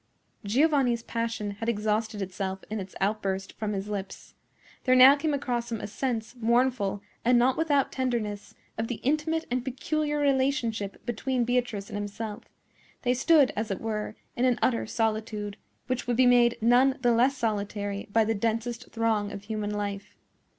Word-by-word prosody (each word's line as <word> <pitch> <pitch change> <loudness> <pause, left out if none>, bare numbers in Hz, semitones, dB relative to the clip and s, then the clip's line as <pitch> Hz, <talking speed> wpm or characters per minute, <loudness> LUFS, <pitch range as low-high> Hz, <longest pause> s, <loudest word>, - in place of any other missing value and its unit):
Giovanni's 250 +1 +2
passion 230 -3 -3
had 225 +3 -3
exhausted 215 -1 -1
itself 190 0 -4
in 215 - -2
its 190 -1 -8
outburst 195 -1 -1
from 210 -1 -2
his 195 0 -3
lips. 200 -2 -6 0.5
There 255 -1 +4
now 260 +2 +9
came 300 +2 -1
across 245 -4 -2
him 225 - -2
a - - -5
sense, 230 +1 -3
mournful, 235 -4 +1 0.2
and 245 +1 +4
not 250 +2 +4
without 290 -4 +1
tenderness, 230 -6 -3 0.2
of 225 - -1
the 245 - -3
intimate 310 +4 0
and 250 0 0
peculiar 295 +4 -1
relationship 260 -7 0
between 245 +2 -1
Beatrice 245 -5 -1
and 205 - -3
himself. 205 +1 -5 0.6
They 250 -1 +3
stood, 280 +2 +4
as 215 +1 -2
it 195 - -2
were, 215 -1 -3 0.2
in 245 - +1
an 250 -2 +3
utter 235 -3 +1
solitude, 215 -2 -2 0.3
which 255 -1 -3
would 240 -1 0
be 260 - +5
made 240 -1 +5
none 250 +4 +4
the 240 - +4
less 250 +4 +3
solitary 205 -3 -2
by 225 +1 +4
the 225 - +1
densest 230 +3 -2
throng 220 -3 0
of 200 -1 -7
human 215 -1 -3
life. 205 -1 -4
230 Hz, 165 wpm, -27 LUFS, 210-255 Hz, 0.6 s, now